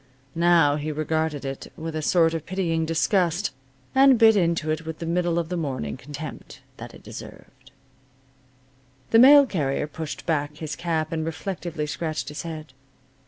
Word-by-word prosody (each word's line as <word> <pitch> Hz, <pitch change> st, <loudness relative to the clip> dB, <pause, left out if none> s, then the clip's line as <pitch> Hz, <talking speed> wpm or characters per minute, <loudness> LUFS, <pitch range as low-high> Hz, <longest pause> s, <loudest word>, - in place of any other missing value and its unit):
Now 165 Hz, -4 st, +4 dB
he 155 Hz, +1 st, -3 dB
regarded 155 Hz, -1 st, -2 dB
it 135 Hz, 0 st, -6 dB
with 160 Hz, 0 st, -5 dB
a 155 Hz, -, -2 dB
sort 165 Hz, +1 st, +3 dB
of 165 Hz, -2 st, -5 dB
pitying 165 Hz, -4 st, -1 dB
disgust, 175 Hz, +2 st, +1 dB, 0.4 s
and 265 Hz, -1 st, +6 dB
bit 220 Hz, -1 st, +6 dB
into 170 Hz, -4 st, +1 dB
it 155 Hz, +1 st, -2 dB
with 160 Hz, 0 st, -6 dB
the 170 Hz, -, -6 dB
middle 170 Hz, 0 st, 0 dB
of 170 Hz, -1 st, -1 dB
the 180 Hz, -, -2 dB
morning 130 Hz, -, -3 dB
contempt 145 Hz, +3 st, -9 dB, 0.2 s
that -, -, -9 dB
it -, -, -15 dB
deserved. 130 Hz, 0 st, -12 dB, 1.4 s
The 225 Hz, -, +6 dB
mail 280 Hz, +3 st, +9 dB
carrier 150 Hz, -, -1 dB
pushed 155 Hz, 0 st, -7 dB
back 150 Hz, -2 st, -1 dB
his 155 Hz, -2 st, -5 dB
cap 160 Hz, -2 st, -2 dB
and 160 Hz, -1 st, -2 dB
reflectively 165 Hz, -1 st, -4 dB
scratched 150 Hz, -3 st, -4 dB
his 150 Hz, -1 st, -6 dB
head. 155 Hz, -4 st, -8 dB
160 Hz, 165 wpm, -24 LUFS, 150-170 Hz, 1.4 s, mail